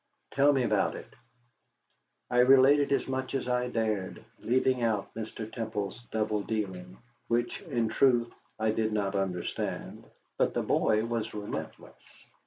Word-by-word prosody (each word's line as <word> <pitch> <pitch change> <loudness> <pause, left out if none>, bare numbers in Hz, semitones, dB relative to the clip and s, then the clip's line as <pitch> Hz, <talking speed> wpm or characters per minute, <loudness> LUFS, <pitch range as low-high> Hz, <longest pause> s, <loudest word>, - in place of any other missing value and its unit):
"Tell 140 +1 +4
me 135 -3 +2
about 105 -4 +1
it." - - -10 1.2
I 125 - +3
related 135 +3 +6
as 140 - +1
much 130 0 -3
as 135 - -2
I 125 0 +1
dared, 110 -5 -2
leaving 130 +1 +1
out 110 -4 -1
Mr. 110 0 -6
Temple's 110 -2 -4
double 110 -1 0
dealing; 95 -4 -4 0.3
which, 120 +1 -1
in 115 -2 -1
truth, 120 0 +2 0.2
I 110 0 +1
did 110 0 0
not 100 -2 0
understand. 95 -3 -3 0.3
But - - +2
the - - 0
boy 110 +1 +2
was 115 -2 -3
relentless. 105 0 -7
115 Hz, 140 wpm, -29 LUFS, 105-125 Hz, 1.2 s, related